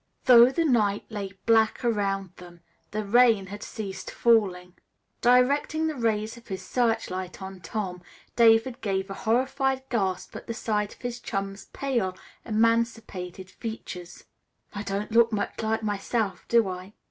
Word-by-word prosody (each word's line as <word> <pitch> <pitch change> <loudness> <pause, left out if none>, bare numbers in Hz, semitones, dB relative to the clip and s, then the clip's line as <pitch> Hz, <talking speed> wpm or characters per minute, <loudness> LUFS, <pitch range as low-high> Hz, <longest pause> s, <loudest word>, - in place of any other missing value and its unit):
Though 240 -1 +9
the 330 +5 0
night 215 -8 +2
lay 200 -3 -5
black 225 +1 +3
around 195 -4 0
them, 175 -1 -13 0.3
the 215 0 -3
rain 225 -2 +5
had 205 +2 -8
ceased 200 -4 -6
falling. 190 -6 +2 0.5
Directing 275 +6 +3
the 315 - 0
rays 225 -3 -1
of 235 - -16
his 190 -1 -6
searchlight 225 -7 -1
on 190 -1 -8
Tom, 180 -2 -4 0.3
David 230 +1 +4
gave 195 -1 -2
a - - -2
horrified 265 +5 0
gasp 190 -6 -1
at - - -8
the 230 - -4
sight 210 -2 -1
of - - -25
his 245 0 -4
chum's 195 -3 -4
pale, 235 -10 -2 0.3
emaciated 220 -5 -1
features. 185 -6 -7 0.5
"I 205 - -4
don't 205 +1 -3
look 230 +1 +5
much 210 +1 -2
like 220 0 -1
myself, 205 -1 -2
do 230 -3 +4
I?" 185 +2 -7
215 Hz, 145 wpm, -26 LUFS, 195-235 Hz, 0.5 s, Though